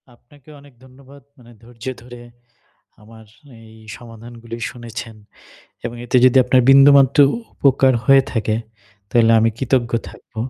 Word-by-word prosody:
আপনাকে 140 +4 -24
অনেক 140 -2 -20
ধন্যবাদ 135 +2 -18 0.2
মানে 120 -1 -19
ধৈর্য 115 0 -15 0.2
ধরে, 120 0 -14 0.8
আমার 110 +1 -17 0.4
এই 110 0 -17 0.2
সমাধানগুলো 115 0 -12
শুনেছেন। 115 -1 -10 0.7
এবং 120 0 -6
এতে 120 - -1
যদি 130 +1 +3
আপনার 125 0 +2
বিন্দুমাত্র 140 0 +5 0.4
উপকার 135 -1 +2
হয়ে 135 +2 +4
থাকে, 110 -2 -2 0.5
তাইলে 115 -1 +2
আমি 115 +1 +1
কৃতজ্ঞ 125 -2 -1 0.2
থাকব, - - -19
120 Hz, 125 wpm, -18 LUFS, 115-135 Hz, 0.8 s, বিন্দুমাত্র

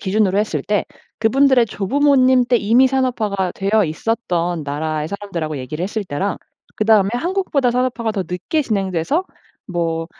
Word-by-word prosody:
기준으로 200 0 +1
했을 170 -9 -1
때 205 -1 0 0.3
그분들의 255 +2 +4
조부모님 260 +4 +3
때 245 - +3
이미 235 +5 +4
산업화가 225 -8 0
되어 200 +1 +1
있었던 175 -2 -2
나라의 155 +1 -3
사람들하고 170 -7 -4
얘기를 150 +6 -5
했을 205 +2 -3
때랑 185 +5 -2 0.4
그다음에 215 -2 +4
한국보다 325 -4 0
산업화가 245 -3 -1
더 195 -3 -2
늦게 180 - -1
진행돼서 200 - -1 0.4
뭐 165 -3 -2
205 Hz, 365 characters per minute, -19 LUFS, 175-250 Hz, 0.4 s, 그분들의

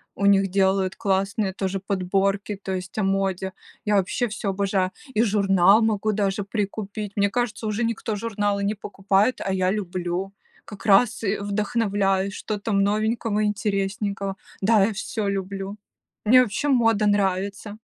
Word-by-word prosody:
у 200 - -1
них 195 -1 +4
делают 190 -1 +1
классные 195 -1 0
тоже 195 0 -2
подборки, 195 +1 -1
то 190 - -4
есть 185 +1 -6
о 215 - +1
моде. 190 -1 -1 0.3
Я 210 -1 +2
вообще 200 +6 +1
всё 210 -1 -4
обожаю, 190 -1 0 0.2
и 220 - +2
журнал 200 -1 +4
могу 215 -1 +1
даже 200 0 0
прикупить. 205 0 -4
Мне 200 0 +2
кажется, 240 -1 -2
уже 215 +3 0
никто 225 -2 -2
журналы 205 -2 -1
не 210 - 0
покупает, 200 +3 0
а 195 - 0
я 185 0 +1
люблю 185 -1 -3 0.3
как 210 -3 -11
раз 215 +3 +4
и 200 0 0
вдохновляюсь, 200 -2 0
что 215 -1 -4
там 200 -1 0
новенького, 215 +1 0
интересненького. 200 -1 -2 0.2
Да, 210 0 +4
я 220 - -1
всё 215 0 -3
люблю, 195 0 -3 0.5
мне 255 +4 +7
вообще 250 +5 -1
мода 225 -5 +3
нравится. 200 +1 0
200 Hz, 150 wpm, -24 LUFS, 195-215 Hz, 0.5 s, мне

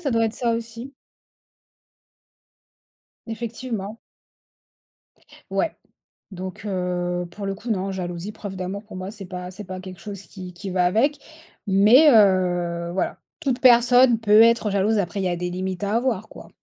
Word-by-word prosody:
ça 285 -6 -2
doit 230 -1 +2
être 220 - -1
ça, 235 -2 0
aussi. 230 +4 -7 2.3
Effectivement. 225 -2 -5 1.5
Ouais, - - -1 0.6
donc 185 +2 -7
heu, 180 -2 -2
pour 205 -1 -7
le 195 0 -2
coup, 225 +4 -9
non. 195 -1 -1
Jalousie, 180 +1 -5
preuve 200 -3 -8
d'amour 190 +3 -5
pour 210 - -12
moi, 185 +1 -5
c'est 205 -3 -10
pas 180 0 -7
c'est 210 +3 -9
pas 185 -1 -7
quelque 185 -1 -10
chose 200 -2 -8
qui 185 -2 -10
qui 190 +3 -7
va 180 -1 +1
avec, 265 +11 +2 0.5
mais 215 +10 +6
heu, 175 -5 +3
voilà, 190 - -2 0.2
toute 265 -5 -1
personne 245 -1 +6
peut 215 0 +6
être 230 -2 +4
jalouse, 205 +2 +1
après, 185 +1 -2
il 195 - -1
y - - +1
a 175 - -1
des 180 +1 -3
limites 185 +2 -4
à 205 +2 0
avoir, 230 -4 -1
quoi. - - -12
200 Hz, 160 wpm, -23 LUFS, 185-230 Hz, 2.3 s, mais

